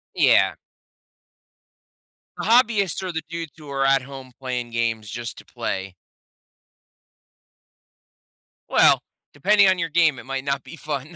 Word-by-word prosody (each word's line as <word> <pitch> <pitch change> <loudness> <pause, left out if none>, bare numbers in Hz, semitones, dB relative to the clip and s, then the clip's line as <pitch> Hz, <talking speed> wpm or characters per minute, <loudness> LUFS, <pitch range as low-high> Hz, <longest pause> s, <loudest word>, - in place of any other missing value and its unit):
Yeah. - - +4 1.8
The - - -4
hobbyists 215 -6 +3
are 185 - -3
the 160 -1 -3
dudes 165 -2 -5
who 150 -2 -12
are 135 -1 0
at 135 0 +4
home 135 0 -10
playing 125 -2 -4
games, 115 -2 -1
just 115 0 -6
to - - -13
play. 95 -1 -5 2.7
Well, - - +5 0.3
depending 200 +7 +4
on 185 -1 +3
your 180 -2 -1
game, 160 -4 +3
it - - -12
might 135 0 -4
not 140 -1 -2
be - - -11
fun. 150 +1 -5
140 Hz, 135 wpm, -23 LUFS, 130-170 Hz, 2.7 s, Well